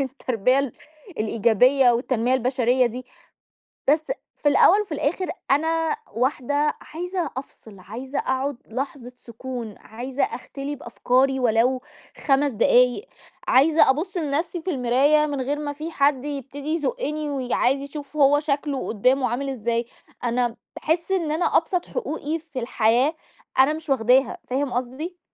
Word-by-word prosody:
التربية 260 Hz, -1 st, 0 dB, 0.5 s
الإيجابية 235 Hz, +4 st, +4 dB
والتنمية 245 Hz, +1 st, +1 dB
البشرية 255 Hz, 0 st, +2 dB
دي، 250 Hz, +2 st, -6 dB, 0.8 s
بس 310 Hz, +9 st, +2 dB, 0.3 s
في 290 Hz, -, +4 dB
الأول 395 Hz, +7 st, +5 dB
وفي 390 Hz, -6 st, -8 dB
الآخر 315 Hz, +5 st, -1 dB, 0.2 s
أنا 320 Hz, +2 st, +1 dB, 0.2 s
واحدة 285 Hz, +4 st, 0 dB
عايزة 355 Hz, +2 st, -4 dB
أفصِل، 220 Hz, -6 st, -10 dB
عايزة 255 Hz, +9 st, -5 dB
أقعُد 265 Hz, 0 st, -1 dB
لحظة 255 Hz, 0 st, -5 dB
سكون، 235 Hz, -2 st, -7 dB
عايزة 250 Hz, +5 st, -4 dB
أختلي 275 Hz, +4 st, -4 dB
بأفكاري 265 Hz, -1 st, +1 dB
ولو 250 Hz, +2 st, +2 dB, 0.4 s
5 280 Hz, 0 st, +3 dB
دقايق، 250 Hz, -, +3 dB, 0.4 s
عايزة 300 Hz, +3 st, +5 dB
أبُص 355 Hz, +7 st, 0 dB
لنفْسي 320 Hz, +3 st, -1 dB
في 370 Hz, -, -2 dB
المراية 275 Hz, +4 st, +3 dB
من 285 Hz, -3 st, -3 dB
غير 290 Hz, +3 st, -2 dB
ما 290 Hz, -1 st, -3 dB
في 310 Hz, +3 st, -6 dB
حد 280 Hz, -3 st, +2 dB
يبتدي 285 Hz, +1 st, -5 dB
يزُقّني، 305 Hz, -, -2 dB
وعايز 265 Hz, 0 st, 0 dB
يشوف 290 Hz, +1 st, -8 dB
هو 290 Hz, 0 st, +5 dB
شكلُه 285 Hz, -2 st, -2 dB
قدامُه 255 Hz, +4 st, +2 dB
عامل 270 Hz, +3 st, -2 dB
إزاي، 235 Hz, -2 st, -1 dB, 0.4 s
أنا 240 Hz, -1 st, 0 dB, 0.2 s
باحِسّ 335 Hz, +4 st, -1 dB
إن 335 Hz, -5 st, 0 dB
أنا 330 Hz, +3 st, +2 dB
أبسط 350 Hz, +2 st, -1 dB
حقوقي 325 Hz, -, -3 dB
في 300 Hz, -5 st, -7 dB
الحياة، 240 Hz, +5 st, +2 dB, 0.4 s
أنا 275 Hz, +3 st, +6 dB
مش 315 Hz, -1 st, -8 dB
واخداها، 260 Hz, +1 st, +3 dB
فاهم 265 Hz, 0 st, -1 dB
قصدي؟ 270 Hz, +9 st, -4 dB
275 Hz, 135 wpm, -23 LUFS, 250-300 Hz, 0.8 s, أنا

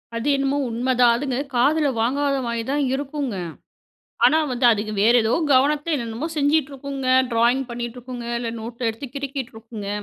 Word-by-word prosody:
அது 230 Hz, +4 st, -3 dB
என்னமோ 275 Hz, +1 st, 0 dB
உண்மதான். 245 Hz, +1 st, +3 dB
அதுங்க 260 Hz, 0 st, -2 dB, 0.2 s
காதுல 290 Hz, +5 st, +3 dB
வாங்காத 275 Hz, +4 st, +1 dB
மாரி 235 Hz, -1 st, -2 dB
தான் 290 Hz, 0 st, +1 dB
இருக்குங்க. 275 Hz, -3 st, -3 dB, 0.9 s
ஆனா, 315 Hz, -, +4 dB
வந்து 245 Hz, 0 st, +2 dB
அதுக 215 Hz, 0 st, -2 dB
வேறு 235 Hz, +3 st, +5 dB
ஏதோ 220 Hz, -, +2 dB, 0.2 s
கவனத்த, 290 Hz, +3 st, +3 dB
என்னனமோ 235 Hz, +4 st, -4 dB
செஞ்சுட்டு 290 Hz, 0 st, +2 dB
இருக்குங்க, 275 Hz, -1 st, -5 dB, 0.2 s
ட்ராயிங் 240 Hz, +4 st, +2 dB
பண்ணிட்டு 240 Hz, 0 st, -5 dB
இருக்குங்க, 245 Hz, -1 st, -7 dB
இல்ல 235 Hz, -1 st, -3 dB
நோட்ட 235 Hz, +1 st, -3 dB
எடுத்து 225 Hz, +5 st, -8 dB
கிறுக்கிட்டு 275 Hz, -3 st, -5 dB
இருக்குங்க. 220 Hz, -2 st, -8 dB
255 Hz, 155 wpm, -22 LUFS, 235-280 Hz, 0.9 s, வேறு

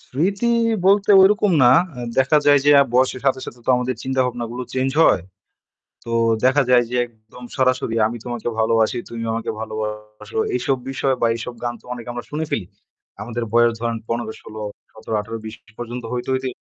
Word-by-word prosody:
স্মৃতি 195 Hz, -, -1 dB, 0.4 s
বলতে 200 Hz, +1 st, +4 dB
ওইরকম 210 Hz, +1 st, +4 dB
না। 120 Hz, -, +7 dB, 0.3 s
আ -, -, -6 dB, 0.2 s
দেখা 135 Hz, +3 st, +4 dB
যায় 145 Hz, 0 st, +7 dB
যে 145 Hz, -, +5 dB
আ -, -, +7 dB
বয়সের 130 Hz, 0 st, +2 dB
সাথে, 130 Hz, -1 st, +2 dB
সাথে 120 Hz, -, -10 dB
তো -, -, +3 dB
আমাদের 125 Hz, 0 st, -1 dB
চিন্তাভাবনাগুলো 125 Hz, -2 st, -2 dB
change 130 Hz, +1 st, -1 dB
হয়। 90 Hz, -, +4 dB, 0.8 s
তো 115 Hz, -, -6 dB, 0.3 s
দেখা 130 Hz, +3 st, +4 dB
যায় 125 Hz, -1 st, +5 dB
যে 125 Hz, -, -3 dB
একদম 110 Hz, +1 st, -16 dB
সরাসরি 130 Hz, -3 st, +1 dB
আমি 120 Hz, +2 st, -6 dB
তোমাকে 120 Hz, -2 st, -5 dB
ভালোবাসি, 115 Hz, +1 st, +2 dB
তুমি 115 Hz, -1 st, -6 dB
আমাকে 115 Hz, -, -3 dB
ভালোবাসো, 105 Hz, -, -6 dB, 0.2 s
এইসব 135 Hz, -, 0 dB
বিষয় 135 Hz, 0 st, 0 dB
বা 115 Hz, -, +4 dB
এইসব 120 Hz, +2 st, -6 dB
গান 120 Hz, 0 st, -1 dB
তো -, -, -23 dB
অনেক 120 Hz, -2 st, -9 dB
আমরা 120 Hz, 0 st, -6 dB
শুনে 155 Hz, +2 st, -2 dB
ফেলি। 100 Hz, -, -1 dB, 0.6 s
আমাদের 115 Hz, +2 st, -4 dB
বয়স 120 Hz, 0 st, +5 dB
ধরেন 115 Hz, -1 st, -1 dB
১৫ 115 Hz, -1 st, -2 dB
১৬ 110 Hz, 0 st, -10 dB, 0.3 s
১৭ 110 Hz, 0 st, -5 dB
১৮ 115 Hz, +2 st, -5 dB
২০ 110 Hz, 0 st, -7 dB, 0.2 s
পর্যন্ত 120 Hz, +1 st, -6 dB
হইতে, 125 Hz, 0 st, -4 dB
হইতে 130 Hz, 0 st, -1 dB
120 Hz, 180 wpm, -21 LUFS, 115-130 Hz, 0.8 s, না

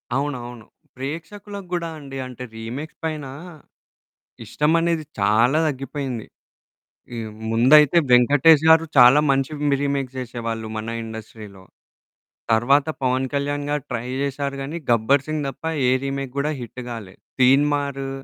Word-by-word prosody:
అవునవును. 125 Hz, -5 st, -4 dB, 0.3 s
ప్రేక్షకులకు 190 Hz, +8 st, -7 dB
గూడా 170 Hz, -1 st, -1 dB
అండి. 135 Hz, -1 st, -9 dB
అంటే, 125 Hz, 0 st, -9 dB
రీమేక్స్ 125 Hz, +8 st, -7 dB
పైనా 150 Hz, -4 st, -4 dB, 1.2 s
ఇష్టమనేది 165 Hz, +1 st, +1 dB, 0.2 s
చాలా 120 Hz, +8 st, +3 dB
దగ్గిపోయింది. 135 Hz, -3 st, -5 dB, 0.9 s
ఈ -, -, -4 dB, 0.3 s
ముందైతే 135 Hz, +7 st, +6 dB
'వెంకటేష్' 145 Hz, +5 st, +6 dB
గారు 160 Hz, 0 st, +6 dB
చాలా 125 Hz, +4 st, +8 dB
మంచి 135 Hz, 0 st, +1 dB, 0.2 s
మి 140 Hz, -, +3 dB
రీమేక్ 140 Hz, -2 st, -1 dB
జేషేవాళ్ళు 115 Hz, -3 st, -4 dB
మన 110 Hz, +1 st, -4 dB
ఇండస్ట్రీలో. 110 Hz, -3 st, -10 dB, 0.9 s
తర్వాత 135 Hz, +6 st, +3 dB
'పవన్ 130 Hz, 0 st, +1 dB
కళ్యాణ్' 145 Hz, 0 st, -1 dB
గారు 145 Hz, -2 st, -1 dB
ట్రై 120 Hz, 0 st, -3 dB
జేశారు 140 Hz, 0 st, -2 dB
గానీ 150 Hz, +5 st, -5 dB
'గబ్బర్ 120 Hz, +4 st, +3 dB
సింగ్' 155 Hz, -2 st, -2 dB
దప్ప 135 Hz, -, -8 dB, 0.2 s
ఏ -, -, +4 dB
రీమేక్ 135 Hz, -1 st, -4 dB
గూడా 150 Hz, +2 st, 0 dB
హిట్టు 120 Hz, +2 st, -8 dB
గాలే. 105 Hz, -5 st, -7 dB, 0.3 s
'తీన్‌మారు' 140 Hz, +1 st, +2 dB
135 Hz, 120 wpm, -22 LUFS, 120-145 Hz, 1.2 s, చాలా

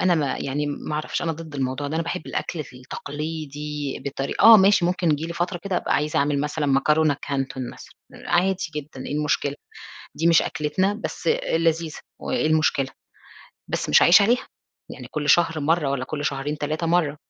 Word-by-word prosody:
أنا 185 Hz, -1 st, +3 dB
ما 145 Hz, -4 st, 0 dB
يعني 145 Hz, +2 st, -2 dB
ما 145 Hz, +1 st, -4 dB
اعرفش 155 Hz, +3 st, -2 dB
أنا 165 Hz, -1 st, 0 dB
ضد 160 Hz, -1 st, -10 dB
الموضوع 135 Hz, +1 st, -2 dB
ده، 155 Hz, -, -4 dB
أنا 165 Hz, -, 0 dB
باحب 170 Hz, +1 st, -4 dB
الأكْل 170 Hz, -, -3 dB
التقليدي 150 Hz, +2 st, -6 dB
بطري 135 Hz, 0 st, -3 dB
آه 225 Hz, 0 st, +11 dB
ماشي 195 Hz, -2 st, +5 dB
ممكن 180 Hz, -1 st, +1 dB
تيجي 150 Hz, +1 st, 0 dB
لي 170 Hz, -, -5 dB
فترة 175 Hz, +1 st, -2 dB
كده 195 Hz, -2 st, -1 dB
أبقى -, -, 0 dB
عايزة 155 Hz, +2 st, 0 dB
أعمل 140 Hz, 0 st, +1 dB
مثلًا 150 Hz, +1 st, -2 dB
مكرونة 145 Hz, +2 st, +3 dB
كانتون 135 Hz, -2 st, -3 dB
مثلًا -, -, -14 dB, 0.2 s
عادي 185 Hz, +2 st, 0 dB
جدًا، 140 Hz, -3 st, -7 dB
إيه -, -, -4 dB
المشكلة؟ 145 Hz, -1 st, 0 dB, 0.6 s
دي 165 Hz, -, +1 dB
مش 165 Hz, -1 st, +6 dB
أكلتنا 185 Hz, +7 st, 0 dB
بس -, -, -5 dB, 0.3 s
لذيذة 165 Hz, -1 st, 0 dB, 0.2 s
وإيه -, -, 0 dB
المشكلة، 155 Hz, -3 st, +2 dB, 0.8 s
بس -, -, -2 dB
مش 75 Hz, -, +6 dB
هاعيش 180 Hz, +4 st, +7 dB
عليها، 240 Hz, +5 st, +1 dB, 0.4 s
يعني -, -, -9 dB
كُلّ 150 Hz, -1 st, -3 dB
شهر 165 Hz, -2 st, +4 dB
مَرّة 155 Hz, -1 st, +1 dB
والّا 135 Hz, -2 st, -1 dB
كُلّ 145 Hz, +2 st, -5 dB
شهرين 145 Hz, +2 st, -2 dB
3 155 Hz, +3 st, -2 dB
مَرّة، 165 Hz, -4 st, +1 dB
150 Hz, 180 wpm, -23 LUFS, 145-170 Hz, 0.8 s, آه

